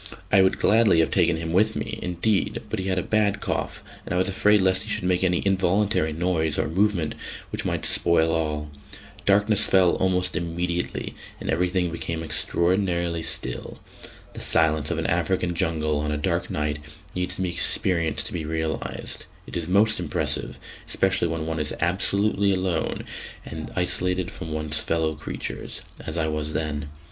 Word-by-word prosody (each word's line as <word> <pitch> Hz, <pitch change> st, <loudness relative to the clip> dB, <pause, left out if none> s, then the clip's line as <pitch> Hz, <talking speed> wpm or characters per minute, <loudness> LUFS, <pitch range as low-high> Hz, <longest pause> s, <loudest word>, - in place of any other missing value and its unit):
I 95 Hz, -, +6 dB
would 95 Hz, -, +3 dB
gladly 110 Hz, -5 st, +4 dB
have 80 Hz, -, 0 dB
taken 85 Hz, -3 st, +3 dB
him 80 Hz, 0 st, -4 dB
with 110 Hz, +4 st, +3 dB
me, 110 Hz, 0 st, -4 dB
indeed, 100 Hz, +4 st, 0 dB
but 110 Hz, -, -1 dB
he 95 Hz, -, -3 dB
had 95 Hz, -1 st, 0 dB
a 90 Hz, -, 0 dB
bad 105 Hz, -2 st, +1 dB
cough, -, -, -3 dB, 0.2 s
and -, -, -3 dB
I -, -, +1 dB
was 95 Hz, -, +2 dB
afraid 105 Hz, +2 st, +3 dB
lest 95 Hz, 0 st, +3 dB
he 110 Hz, -, -3 dB
should -, -, -2 dB
make 90 Hz, 0 st, +1 dB
any 90 Hz, -1 st, +2 dB
involuntary 95 Hz, -2 st, +2 dB
noise 80 Hz, -2 st, 0 dB
or -, -, 0 dB
movement 90 Hz, -1 st, +1 dB, 0.4 s
which -, -, -4 dB
might -, -, -1 dB
spoil 80 Hz, -1 st, +4 dB
all. 75 Hz, -2 st, -1 dB, 0.6 s
Darkness 105 Hz, +1 st, +4 dB
fell 95 Hz, -2 st, +5 dB
almost 90 Hz, -1 st, +1 dB
immediately, 85 Hz, 0 st, -2 dB, 0.3 s
and -, -, -3 dB
everything 90 Hz, +1 st, +1 dB
became 85 Hz, 0 st, -3 dB
extraordinarily 85 Hz, +1 st, +1 dB
still. -, -, -1 dB, 0.6 s
The -, -, -8 dB
silence 80 Hz, -2 st, +2 dB
of -, -, -1 dB
an -, -, -2 dB
African 90 Hz, -2 st, +1 dB
jungle 80 Hz, -3 st, 0 dB
on 75 Hz, 0 st, -1 dB
a 75 Hz, -, -1 dB
dark 75 Hz, -, -1 dB
night 75 Hz, 0 st, -1 dB, 0.3 s
needs 90 Hz, 0 st, -1 dB
to 95 Hz, -, -1 dB
be 90 Hz, -, 0 dB
experienced 85 Hz, -1 st, +1 dB
to -, -, -4 dB
be 80 Hz, -, -3 dB
realised; 80 Hz, 0 st, -3 dB, 0.2 s
it -, -, -9 dB
is 85 Hz, -2 st, -2 dB
most 105 Hz, +3 st, +3 dB
impressive, 85 Hz, -4 st, -1 dB, 0.3 s
especially 95 Hz, -2 st, +1 dB
when 80 Hz, -1 st, -3 dB
one 80 Hz, 0 st, -2 dB
is 75 Hz, -1 st, -2 dB
absolutely 100 Hz, +3 st, +2 dB
alone 90 Hz, -3 st, -1 dB, 0.4 s
and 80 Hz, -1 st, -6 dB
isolated 90 Hz, 0 st, +1 dB
from 80 Hz, -2 st, -7 dB
one's 75 Hz, -1 st, 0 dB
fellow 80 Hz, -1 st, 0 dB
creatures, 75 Hz, +1 st, -6 dB, 0.2 s
as 80 Hz, +1 st, -5 dB
I 80 Hz, -1 st, +1 dB
was 75 Hz, 0 st, -2 dB
then. 75 Hz, -2 st, -2 dB
85 Hz, 175 wpm, -24 LUFS, 80-95 Hz, 0.6 s, I